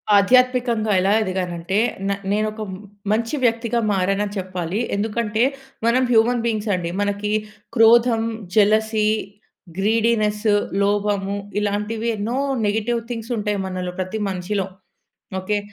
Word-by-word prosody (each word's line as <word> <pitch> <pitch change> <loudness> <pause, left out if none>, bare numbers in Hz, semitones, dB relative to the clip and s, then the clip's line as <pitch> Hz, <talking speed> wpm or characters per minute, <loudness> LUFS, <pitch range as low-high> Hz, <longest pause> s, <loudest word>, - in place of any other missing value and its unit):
ఆధ్యాత్మికంగా 245 0 +3
ఎలా 195 +2 +2
ఎదిగాను 185 -3 -2
అంటే, 175 +4 -2 0.3
న 200 - +1 0.2
నేను 215 +1 +1
ఒక 215 - -8
మ్ 185 - -7 0.3
మంచి 230 +6 0
వ్యక్తిగా 235 0 +1
మారాను 195 +1 +1
అని 205 0 -7
చెప్పాలి. 185 +1 -3 0.2
ఎందుకంటే 220 +1 0 0.4
మనం 235 +2 +3
హ్యూమన్ 230 +1 +3
బీయింగ్స్ 220 -2 -1
అండి. 175 -2 -3
మనకి 205 +1 -1 0.4
క్రోధం, 230 0 +5 0.3
జలసీ, 215 +1 +3 0.7
గ్రీడీనెస్, 215 0 +1 0.4
లోభము 200 -1 0 0.2
ఇలాంటివి 210 +3 -1
ఎన్నో 225 +5 -2 0.3
నెగెటివ్ 220 +3 0
థింగ్స్ 230 +1 -5
ఉంటాయి 210 -1 -1
మనలో 185 -1 -4
ప్రతి 185 +4 -3
మనిషిలో. 190 +1 -2 0.7
ఓకె. 205 +3 -1
210 Hz, 120 wpm, -21 LUFS, 200-230 Hz, 0.7 s, క్రోధం